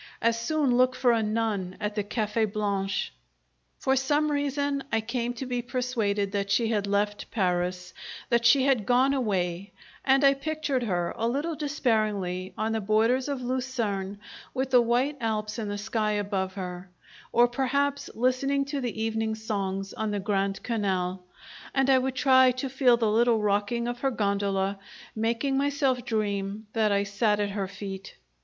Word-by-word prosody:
As 230 0 +1
soon 275 +1 +1
look 255 +1 +3
for 250 -1 +3
a 230 -1 +2
nun 210 -4 -1
at 210 0 -2
the 210 - -1
Cafe' 215 +1 0
Blanche! 200 -2 -2 0.6
For 265 - +1
some 290 +3 +1
reason 285 -1 -1
I 225 - +2
came 240 +2 -3
to 265 - -5
be 245 -1 -2
persuaded 230 -6 -1
that 200 -1 -2
she 225 +3 +2
had 205 -3 0
left 205 +1 -1
Paris, 180 -2 -1 0.4
that 235 0 +2
she 260 +3 +5
had 255 -7 +2
gone 255 +3 +4
away; 195 -7 -1 0.3
and 270 +1 +4
I 275 0 +7
pictured 290 -2 -2
her 180 -7 -1
a 230 - -1
little 290 +7 -1
despairingly 215 - -1
on 220 +1 -1
the 225 0 -1
borders 225 +6 +2
of 270 -3 -3
Lucerne, 235 -6 -2 0.4
with 260 0 -1
the 250 -1 +7
white 250 +5 +1
Alps 215 0 -2
in 215 - -3
the 205 0 -3
sky 215 0 -1
above 195 -2 -2
her, 180 -1 -6 0.4
or 240 +1 +5
perhaps 280 +3 -1
listening 265 +3 +1
to 280 0 -3
the 235 -3 -4
evening 220 0 -1
songs 195 -3 -3
on 220 -1 -2
the 205 -1 -1
Grand 195 0 -1
Canal, 190 -5 -1 0.5
and 270 0 +3
I 260 - +6
would 260 0 -2
try 260 -1 +6
to 255 +2 -4
feel 255 -2 +4
the 230 -2 +1
little 230 +1 +3
rocking 210 +3 0
of 240 0 -3
her 270 - +1
gondola, 200 -3 0 0.4
making 230 +5 0
myself 275 -3 +1
dream 205 -1 -2
that 220 -2 +2
I 200 0 +2
sat 205 +1 +1
at 205 -1 0
her 195 -1 -2
feet. 195 0 -8
225 Hz, 170 wpm, -27 LUFS, 200-255 Hz, 0.6 s, I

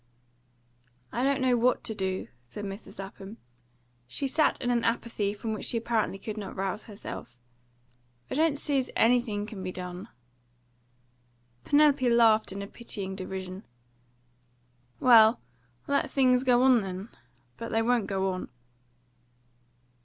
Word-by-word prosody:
"I 240 - -1
don't 275 0 +2
know 255 -1 +3
what 240 +1 +2
to 220 - -3
do," 190 -2 -3 0.2
said 205 +12 -7
Mrs. 195 +2 -8
Lapham. 195 +2 -9 0.7
She 275 - -2
sat 300 +3 +2
in 245 -1 0
an 235 -1 +1
apathy 230 -3 -1
from 220 +2 -4
which 215 - -5
she 235 - 0
apparently 225 -3 0
could 210 +2 -6
not 200 -3 -6
rouse 195 +2 -3
herself. 200 - -9 0.9
"I - - -1
don't 310 0 +2
see 285 -1 0
as 255 - -3
anything 230 -3 +2
can 210 -3 -8
be 185 0 -4
done." 180 +3 -7 1.6
Penelope 285 -4 +4
laughed 225 -3 +4
in 200 +1 -5
a - - -7
pitying 200 -4 -5
derision. 190 0 -6 1.4
"Well, 230 -2 +7 0.5
let 280 0 +1
things 255 -2 +3
go 250 -1 +4
on 255 -3 +5
then. 190 +2 -6 0.5
But 230 - -6
they 225 0 +1
won't 240 -2 +1
go 190 -1 0
on." 185 - -6
225 Hz, 140 wpm, -28 LUFS, 195-245 Hz, 1.6 s, Well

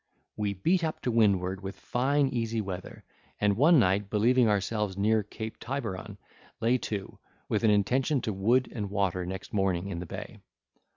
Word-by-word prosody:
We 105 -1 -2
beat 170 - +1
up 160 -1 -2
to 125 - -1
windward, 95 -4 +2
with 95 0 -6
fine 140 +3 +1
easy 115 -2 -1
weather, 95 -3 -6 0.4
and 100 -1 +2
one 155 - +6
night 100 -3 +2
believing 115 +3 +3
ourselves 105 -1 -1
near 110 +2 +3
Cape 110 +2 -7
Tiberon, 110 -6 -5 0.4
lay 120 +3 +2
to, 100 -3 -5 0.3
with - - 0
an 110 - +5
intention 125 +8 +2
to 110 - -2
wood 115 +7 +2
and 105 -4 -3
water 95 -3 -1
next 95 +1 -7
morning 95 -2 0
in 85 -3 -4
the 90 - -6
bay. - - -8
105 Hz, 170 wpm, -28 LUFS, 95-120 Hz, 0.4 s, one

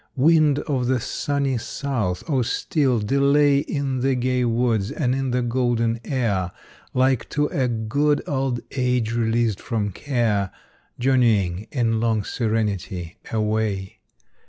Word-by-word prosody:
Wind 150 0 +4
of 130 -5 -1
the 130 -1 +2
sunny 140 +1 -1
south! 110 -9 -2
oh 140 -5 +1
still 130 +2 +1
delay 140 +5 +3
In 140 -2 -2
the 135 +1 +1
gay 125 0 0
woods 115 -3 +1
and 125 -4 0
in 135 0 -1
the 125 0 0
golden 120 -1 0
air, 105 -10 -1 0.4
Like 130 -2 +2
to 150 0 +1
a 130 -3 0
good 135 +6 0
old 135 -4 -1
age 125 -3 0
released 115 -2 +1
from 105 -3 -2
care, 110 -5 0 0.5
Journeying, 110 -7 +2
in 115 -4 +1
long 110 -2 +1
serenity, 105 -6 -2
away. 105 -3 -1
120 Hz, 130 wpm, -23 LUFS, 110-135 Hz, 0.5 s, Wind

